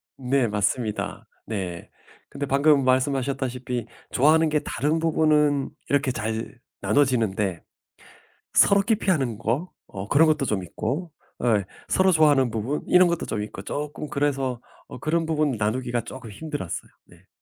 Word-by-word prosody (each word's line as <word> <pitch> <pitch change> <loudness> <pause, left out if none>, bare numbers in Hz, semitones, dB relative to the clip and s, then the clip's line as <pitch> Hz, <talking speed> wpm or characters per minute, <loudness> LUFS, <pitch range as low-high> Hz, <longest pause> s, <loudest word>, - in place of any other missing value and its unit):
네, 130 -1 +1
맞습니다. 105 +1 -2 0.2
네. 95 -6 -5 0.4
근데 140 0 -4
방금 140 +1 +4
말씀하셨다시피 130 -2 0 0.3
좋아하는 155 +4 +4
게 150 0 +2
다른 150 +6 0
부분은 150 -3 +2 0.2
이렇게 140 -2 +2
잘 110 +2 -4 0.2
나눠지는데 110 - +1 0.9
서로 200 0 +6
기피하는 180 - 0
거? 125 +11 -2 0.2
어 100 0 -7
그런 155 +3 +5
것도 150 -3 +2
좀 105 -6 -1
있고 135 - -4 0.3
어 120 -3 +3
이 - - -4 0.2
서로 185 0 +3
좋아하는 145 -6 +4
부분 115 +7 -2
이런 180 0 +6
것도 170 -1 -1
좀 105 - -2
있고 95 - -8
쪼끔 145 +5 -5
그래서 135 -4 -1 0.3
어 - - -9
그런 165 +4 0
부분 155 -2 +1
나누기가 120 +2 -1
쪼끔 120 0 -9
힘들었어요. 145 - -5 0.2
네. - - -21
135 Hz, 310 characters per minute, -24 LUFS, 115-150 Hz, 0.9 s, 서로